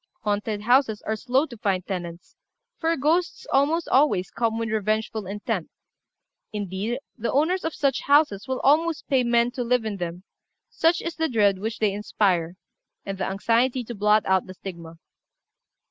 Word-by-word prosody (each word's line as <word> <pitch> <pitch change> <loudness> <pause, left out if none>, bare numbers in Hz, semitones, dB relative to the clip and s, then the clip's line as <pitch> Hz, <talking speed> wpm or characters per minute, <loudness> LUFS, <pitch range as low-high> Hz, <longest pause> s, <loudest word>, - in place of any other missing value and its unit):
Haunted 210 0 -1
houses 245 -1 +2
are 220 - -1
slow 255 +6 +1
to 255 - -11
find 190 -3 -1
tenants, 175 -3 -6 0.4
for 330 0 +1
ghosts 335 - 0
almost 305 +5 +2
always 260 -9 +2
come 225 -1 -1
with 230 0 -2
revengeful 215 -1 -1
intent; 205 -2 -3 0.8
indeed, 205 +3 -3 0.2
the 230 0 -1
owners 330 +7 +1
of 325 - -3
such 275 -3 +1
houses 285 -8 +3
will 260 -1 -2
almost 315 +3 +2
pay 265 -2 +3
men 235 0 +2
to 245 0 -3
live 245 -1 +1
in 210 -2 -3
them, 175 0 -5 0.5
such 330 +1 +2
is 335 - -3
the 320 0 0
dread 205 -5 +3
which 220 +3 -3
they 210 -3 +1
inspire, 185 -4 0 0.5
and 195 -1 -5
the 190 - -1
anxiety 235 +6 +1
to 240 - -7
blot 210 0 +3
out 190 -1 +2
the 185 - -9
stigma. 170 -4 -9
220 Hz, 165 wpm, -25 LUFS, 195-265 Hz, 0.8 s, houses